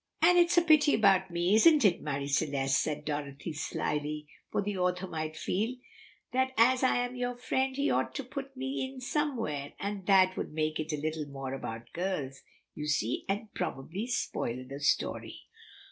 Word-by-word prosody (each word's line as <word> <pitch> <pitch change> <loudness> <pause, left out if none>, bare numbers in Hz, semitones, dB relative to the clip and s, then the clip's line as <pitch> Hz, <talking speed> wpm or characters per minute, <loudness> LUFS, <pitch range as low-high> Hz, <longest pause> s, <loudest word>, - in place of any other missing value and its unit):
"And 355 - +7
it's 345 0 +4
a 345 - +7
pity 310 -3 +5
about 195 -3 +4
me, 175 +2 +1
isn't 290 +4 +6
it, 180 -3 +4
Marie 140 -2 -2
Celeste," 140 -2 +1
said 150 -1 -3
Dorothy 145 +1 -4
slyly, 150 0 -3 0.2
"for - - -1
the 205 0 -2
author 180 0 0
might 155 -3 -4
feel 210 +9 -1 0.6
that 260 +1 +1
as 250 +3 +5
I 260 - +3
am 245 +1 -7
your 245 0 -2
friend 260 +1 0
he 280 +1 +1
ought - - 0
to 275 - -3
put 270 +1 -7
mein 265 0 -3
somewhere, 240 - -2
and 200 -2 -4
that 185 -2 +5
would - - -4
make 155 0 -1
it 155 +1 -3
a 150 - -1
little 155 0 -3
more 135 -1 -5
about 115 -3 -6
girls, 155 -7 -3 0.3
you 150 - -5
see, 125 -6 0
and 205 +2 -2
probably 170 - -4
spoil 130 - -2
the 140 +1 -7
story." 145 - -1
185 Hz, 175 wpm, -30 LUFS, 150-250 Hz, 0.6 s, And